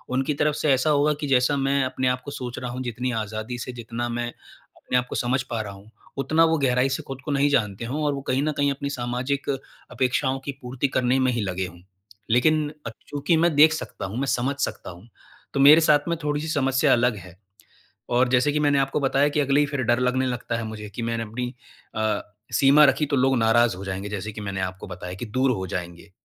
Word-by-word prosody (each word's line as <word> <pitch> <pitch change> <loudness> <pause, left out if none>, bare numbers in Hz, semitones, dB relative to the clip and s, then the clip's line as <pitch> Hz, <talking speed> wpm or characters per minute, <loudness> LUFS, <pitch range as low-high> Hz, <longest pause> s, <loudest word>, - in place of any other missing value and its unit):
उनकी 135 +3 0
तरफ 150 0 +2
से 150 -2 +1
ऐसा 130 +4 +1
होगा 150 +1 +3
कि 145 - -2
जैसा 135 +2 +3
मैं 135 0 +1
अपने 130 0 -1
आप 125 0 0
को 145 - -6
सोच 125 -3 -6
रहा 125 -1 -5
हूँ 125 +1 -5
जितनी 125 +1 -3
आज़ादी 110 +3 -5
से, 125 - -5
जितना 120 0 -4
मैं 120 0 -2 0.5
अपने 125 - -1
आपको 125 0 -2
समझ 125 +2 0
पा 115 -3 -3
रहा 100 -2 -7
हूँ, 100 +3 -15 0.3
उतना 160 +4 +3
वो 160 0 +2
गहराई 130 -1 +2
से - - -8
खुद 135 -1 -8
को 150 - -2
नहीं 140 +1 +2
जानते 115 -5 0
हों 150 +5 -3
और 145 - +1
वो 140 - -4
कहीं 135 +2 +1
न 155 - +1
कहीं 145 0 +2
अपनी 140 +1 -4
सामाजिक 125 +4 -2 0.4
अपेक्षाओं 130 +1 0
की 140 - -2
पूर्ति 125 +2 -2
करने 130 +1 +2
में 130 -1 +2
ही 120 - -1
लगे 95 -1 -2
हों। 85 0 -14 0.5
लेकिन 150 +5 +3 0.2
अ, - - -2 0.2
चूँकि 145 +3 +1
मैं 165 -2 +2
देख 155 +2 +7
सकता 155 - -5
हूँ, 100 +5 -5
मैं 140 - -1
समझ 130 +4 0
सकता - - -4
हूँ, 90 +7 -14 0.5
तो 140 - -1
मेरे 150 +4 +8
साथ 150 -2 +5
में 170 - 0
थोड़ी-सी 150 +1 -1
समस्या 135 -2 +2
अलग 120 -1 +2
है। 90 -1 -12 0.8
और 125 0 +4
जैसे 130 +3 +3
कि 150 - 0
मैंने 145 -1 +3
आपको 135 +2 0
बताया 140 +1 +2
कि 150 - +2
अगले 140 +1 +3
ही 145 - +3
फिर 140 -2 -3
डर 120 +1 +2
लगने 130 +1 +1
लगता 120 -2 -2
है 115 - -4
मुझे, 105 -1 -7
कि 115 +4 -6
मैंने 115 0 -2
अपनी 125 +3 -5 0.4
अ, 110 -1 0 0.3
सीमा 140 +2 +6
रखी 150 - +2
तो 140 0 0
लोग 130 0 +3
नाराज़ 115 -2 +3
हो 100 - -8
जाएँगे 95 +1 -4
जैसे 105 +1 -4
कि 105 - -8
मैंने 95 -1 -4
आपको 95 0 -4
बताया 90 0 -7
कि 115 +5 -6
दूर 130 +5 +1
हो 95 -4 -3
जाएँगे 85 +2 -6
125 Hz, 235 wpm, -24 LUFS, 115-140 Hz, 0.8 s, मेरे